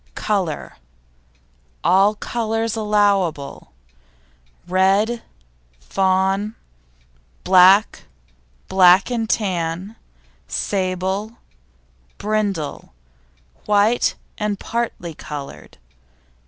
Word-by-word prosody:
COLOUR 190 -8 -2 1.1
All 195 +4 +4
colours 225 0 -2
allowable, 200 -9 0 1.0
red, 195 +6 +2 0.6
fawn, 190 - 0 0.9
black, 190 +3 +5 0.6
black 185 +3 +5
and 225 -2 -2
tan, 185 0 -2 0.5
sable, 190 +3 -2 0.8
brindle, 200 - -3 0.7
white 210 +3 +2 0.2
and 210 -2 -2
parti 230 -8 -4
coloured. 145 -2 -9
195 Hz, 60 wpm, -20 LUFS, 185-215 Hz, 1.1 s, black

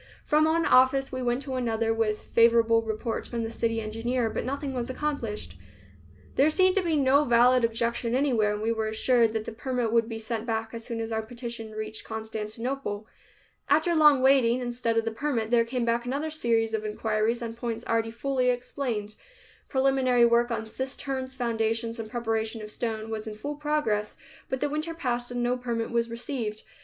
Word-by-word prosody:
From 305 +1 +4
one 325 +1 +2
office 260 +2 +4
we 255 0 -3
went 245 +2 0
to 265 -1 -5
another, 230 -3 0
with 220 -1 -1
favorable 230 -1 +5
reports 225 +1 -3
from 235 -1 -2
the 225 - -4
city 230 0 -1
engineer, 225 +2 -1
but - - -2
nothing 275 +1 -3
was 245 -1 -3
accomplished. 260 -6 -3 0.8
There 280 +3 +5
seemed 370 +3 +4
to - - +4
be 335 -3 0
no 280 0 +4
valid 245 -1 +5
objection 230 +1 0
anywhere, 240 -7 +2
and 210 +1 -4
we 225 - +1
were 220 -1 -1
assured 230 +1 +3
that 220 -1 -2
the - - -5
permit 245 0 -2
would 230 0 +3
be 225 - -4
sent 225 +1 -4
back 225 0 -2
as 230 0 -6
soon 230 -1 -4
as 225 0 -4
our 220 0 0
petition 235 -1 -7
reached 215 0 -5
Constantinople. 220 +1 -4 0.6
After 315 +4 +3
long 300 -4 +6
waiting, 260 -3 +5
instead 240 -2 -1
of 225 - +2
the 225 - -1
permit 230 -2 -2
there 235 -1 +4
came 245 0 -2
back 235 0 +1
another 280 +6 -2
series 230 -6 +1
of 220 -1 -1
inquiries 215 +2 -1
on 230 -1 -4
points 230 0 -4
already 225 0 +1
fully 255 +2 0
explained. 245 -4 -2 0.6
Preliminary 265 -3 +3
work 235 +1 +3
on 230 -2 -2
cisterns, 260 +2 -4
foundations 230 -1 -1
and 220 -1 -5
preparation 225 -2 -2
of 210 - -7
stone 220 -1 -3
was 220 0 -4
in 215 - -5
full 285 +8 -4
progress, 295 -9 -1 0.3
but 260 - -2
the 290 - +1
winter 310 +3 -3
passed 245 -6 -2
and 245 0 -2
no 245 +1 +1
permit 235 -2 -3
was 235 0 +1
received. 230 -2 -4
235 Hz, 190 wpm, -27 LUFS, 225-260 Hz, 0.8 s, long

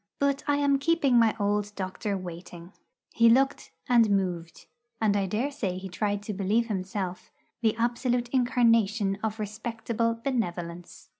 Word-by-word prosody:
But 280 0 0
I 290 0 +2
am 280 -1 +2
keeping 280 -5 +3
my 225 -2 +3
old 205 0 0
doctor 195 +2 -3
waiting. 175 0 -9 0.4
He 230 0 +5
looked 270 +4 +2 0.2
and 235 -3 +5
moved, 180 -5 -2 0.3
and 210 -2 +2
I 195 -1 +1
dare 230 +9 -1
say 195 -10 -3
tried 205 +2 -2
to 210 - -4
believe 210 +4 0
himself, 190 -2 -4 0.3
the 220 -2 +2
absolute 240 +1 0
incarnation 230 -5 +2
of 220 0 -2
respectable 230 +2 -2
Benevolence. 175 -9 -4
215 Hz, 140 wpm, -27 LUFS, 195-240 Hz, 0.4 s, He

